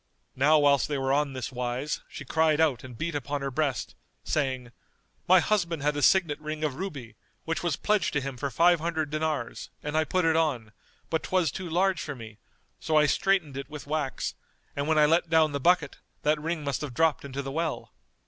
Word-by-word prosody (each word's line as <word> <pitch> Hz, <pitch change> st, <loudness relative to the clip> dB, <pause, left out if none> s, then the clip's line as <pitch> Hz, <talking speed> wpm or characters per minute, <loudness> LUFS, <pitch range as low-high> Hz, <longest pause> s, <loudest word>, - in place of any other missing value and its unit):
Now 150 Hz, +4 st, +5 dB
whilst 145 Hz, -2 st, +4 dB
they 145 Hz, -, -2 dB
were 135 Hz, 0 st, 0 dB
on 145 Hz, -1 st, +1 dB
this 130 Hz, 0 st, -5 dB
wise, 125 Hz, +3 st, -3 dB
she 145 Hz, -, -8 dB
cried 160 Hz, +2 st, +2 dB
out 155 Hz, -6 st, +2 dB
and 125 Hz, -3 st, -10 dB
beat 170 Hz, +5 st, -3 dB
upon 145 Hz, 0 st, -3 dB
her 135 Hz, 0 st, -3 dB
breast, 140 Hz, 0 st, -1 dB, 0.3 s
saying, 130 Hz, -5 st, -1 dB, 0.6 s
"My 185 Hz, +1 st, +7 dB
husband 170 Hz, -5 st, 0 dB
had 150 Hz, 0 st, +1 dB
a 145 Hz, -, -2 dB
signet 160 Hz, +1 st, +3 dB
ring 155 Hz, 0 st, -5 dB
of 150 Hz, -3 st, 0 dB
ruby, 140 Hz, -8 st, -6 dB, 0.3 s
which 165 Hz, 0 st, -2 dB
was 175 Hz, -5 st, 0 dB
pledged 210 Hz, +4 st, +1 dB
to 150 Hz, -, +2 dB
him 135 Hz, 0 st, -5 dB
for 140 Hz, +3 st, -3 dB
five 170 Hz, +4 st, +4 dB
hundred 160 Hz, -2 st, -2 dB
dinars, 155 Hz, 0 st, -2 dB
and 150 Hz, +1 st, -3 dB
I 155 Hz, -, +4 dB
put 185 Hz, +2 st, 0 dB
it 160 Hz, -1 st, +3 dB
on; 135 Hz, -10 st, 0 dB, 0.4 s
but 160 Hz, -, +1 dB
'twas 180 Hz, -6 st, +1 dB
too 185 Hz, +1 st, -6 dB
large 185 Hz, +2 st, +1 dB
for 145 Hz, -, -5 dB
me, 110 Hz, -3 st, -11 dB, 0.4 s
so 155 Hz, -1 st, +1 dB
I 150 Hz, -, +6 dB
straitened 170 Hz, -4 st, +1 dB
it 140 Hz, -, -6 dB
with 150 Hz, -4 st, -8 dB
wax, 145 Hz, -3 st, -2 dB, 0.4 s
and 140 Hz, +1 st, -2 dB
when 160 Hz, -1 st, +2 dB
I 150 Hz, -, +6 dB
let 165 Hz, +2 st, +2 dB
down 160 Hz, -2 st, +4 dB
the 140 Hz, -, -2 dB
bucket,[FN#231] 170 Hz, 0 st, 0 dB
that 150 Hz, 0 st, +2 dB
ring 160 Hz, 0 st, -2 dB
must 140 Hz, -3 st, -2 dB
have 140 Hz, -5 st, -5 dB
dropped 160 Hz, +1 st, +2 dB
into 140 Hz, 0 st, -5 dB
the 135 Hz, -, -5 dB
well. 160 Hz, +1 st, -3 dB
150 Hz, 215 wpm, -27 LUFS, 135-165 Hz, 0.6 s, My